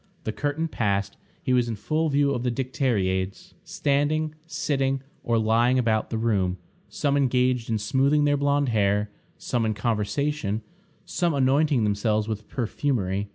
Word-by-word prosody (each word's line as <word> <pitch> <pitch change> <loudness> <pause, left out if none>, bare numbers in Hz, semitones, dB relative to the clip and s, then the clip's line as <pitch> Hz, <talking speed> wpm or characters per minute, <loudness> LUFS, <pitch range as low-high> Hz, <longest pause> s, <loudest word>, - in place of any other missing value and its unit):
The 110 - -2
curtain 145 +7 -2
passed, 100 -8 -1 0.3
he 130 - +1
was 125 -1 +3
in 115 - -2
full 155 +9 -1
view 140 0 +2
of 120 - -2
the 125 - 0
dicteriades, 110 -8 -1
standing, 155 -3 0
sitting, 135 -4 -1 0.2
or 115 -1 +1
lying 115 +3 +3
about 110 -3 +1
the 115 - -2
room; 100 -5 0 0.3
some 140 -1 0
engaged 125 -3 +1
in 110 - +1
smoothing 135 +7 +2
their 145 0 +3
blonde 145 -1 +1
hair, 105 -1 +1 0.3
some 120 -2 -1
in 110 -1 0
conversation, 110 +1 -1 0.4
some 170 -4 0
anointing 140 -1 +3
themselves 105 +1 +1
with 110 -1 -4
perfumery. 105 -6 -1
125 Hz, 150 wpm, -25 LUFS, 110-145 Hz, 0.4 s, was